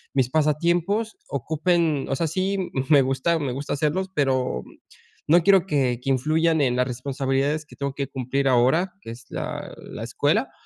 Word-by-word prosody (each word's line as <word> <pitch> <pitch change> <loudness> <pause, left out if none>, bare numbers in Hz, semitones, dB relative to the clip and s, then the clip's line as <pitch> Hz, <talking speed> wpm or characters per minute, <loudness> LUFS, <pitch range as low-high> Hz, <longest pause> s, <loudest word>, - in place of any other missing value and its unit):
mis 130 -2 +2
pasatiempos 170 +8 +1
ocupen 160 +1 0
o - - 0
sea 165 - -1
sí, 185 +3 -1 0.2
me 145 -3 +6
gusta 135 +6 +1
me 140 -4 -2
gusta 140 +4 -4
hacer 150 +1 0 0.2
pero 130 -4 0 0.6
no 165 +2 +5
quiero 195 -1 +5
que 130 -6 +1
que 135 - -3
influyan 155 +5 +2
en 125 -3 +2
las 125 +1 +1
responsabilidades 135 +4 -1
que - - -15
tengo 140 -1 -3
que 140 -2 -3
cumplir 135 +1 -2
ahora, 130 +9 +3
que 115 - -8
es 120 +1 -11
la - - -5
la - - -8
escuela - - 0
145 Hz, 170 wpm, -24 LUFS, 130-165 Hz, 0.6 s, me